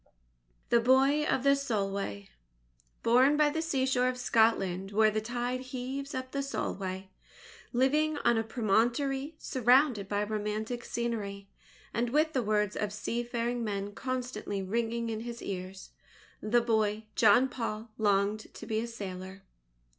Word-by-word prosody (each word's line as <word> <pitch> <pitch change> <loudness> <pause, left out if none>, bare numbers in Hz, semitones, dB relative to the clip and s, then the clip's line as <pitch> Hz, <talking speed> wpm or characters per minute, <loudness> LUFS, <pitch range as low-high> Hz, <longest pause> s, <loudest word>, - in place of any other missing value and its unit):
THE 235 - +5
BOY 270 +5 +4
OF 260 - 0
THE 275 0 +5
SOLWAY 195 - -2 0.7
Born 255 +5 +5
by 300 -1 +4
the 320 +2 -1
seashore 265 -5 +1
of 255 - -3
Scotland 195 -6 +2
where 215 +1 +4
the 215 0 -1
tide 245 +2 -2
heaves 260 +2 -5
up 260 0 -4
the 280 - -1
Solway, 190 -8 -4 0.6
living 295 +5 +2
on 235 - +5
a 225 - +2
promontory 245 +6 0
surrounded 250 -6 +3
by 205 0 0
romantic 215 +3 -3
scenery, 205 -4 -3 0.4
and 235 +1 0
with 310 +4 +2
the 260 - +1
words 210 -2 0
of 210 -1 -2
seafaring 235 +2 -2
men 200 -1 -3
constantly 245 -6 -3
ringing 230 +3 -1
in 220 - -3
his 235 +1 -6
ears, 190 0 -6 0.5
the 235 +3 +3
boy, 220 -2 +1
John 235 +4 +5
Paul, 230 -3 -5
longed 205 0 +1
to - - -8
be 220 0 -1
a 235 - -3
sailor. 190 -3 -7
230 Hz, 140 wpm, -30 LUFS, 210-255 Hz, 0.7 s, THE